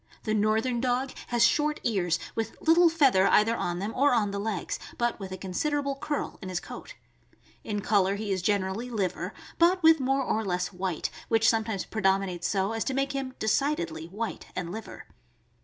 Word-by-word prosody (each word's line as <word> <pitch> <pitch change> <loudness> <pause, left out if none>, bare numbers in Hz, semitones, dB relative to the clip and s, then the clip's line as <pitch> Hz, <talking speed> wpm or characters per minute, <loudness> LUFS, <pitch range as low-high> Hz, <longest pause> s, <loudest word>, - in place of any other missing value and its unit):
The 215 - -1
northern 220 +3 +1
dog 255 +1 0 0.2
has 240 -1 +4
short 300 +3 +2
ears, 180 -7 +1 0.2
with 225 -1 -3
little 335 +2 +5
feather 270 -12 +4
either 225 +2 +4
on 175 -5 -2
them 205 +5 -3
or 275 -1 +4
on 210 -3 +1
the 200 - -3
legs, 205 -3 -3 0.2
but 240 -1 0
with 190 -2 -7
a 185 - -5
considerable 280 +10 -1
curl 290 +1 -4
in 190 - -6
his 180 -1 -2
coat. - - -10 0.7
In 205 -2 -3
color 200 -1 +2
he 205 0 -4
is 190 -2 0
generally 200 +4 -1
liver, 185 -5 -2 0.3
but 350 +1 +4
with 320 -1 +7
more 270 +1 +1
or 220 -3 0
less 180 -1 -2
white, 180 -3 -2 0.2
which 225 0 +3
some 225 -1 +3
times 200 -5 -3
predominates 190 -4 0
so 195 +2 0
as 225 0 -1
to 265 - -1
make 275 +1 0
him 270 -2 -4
decidedly 190 - 0
white 215 +6 -5
and 175 -2 -3
liver. 220 +3 -8
220 Hz, 190 wpm, -28 LUFS, 190-260 Hz, 0.7 s, with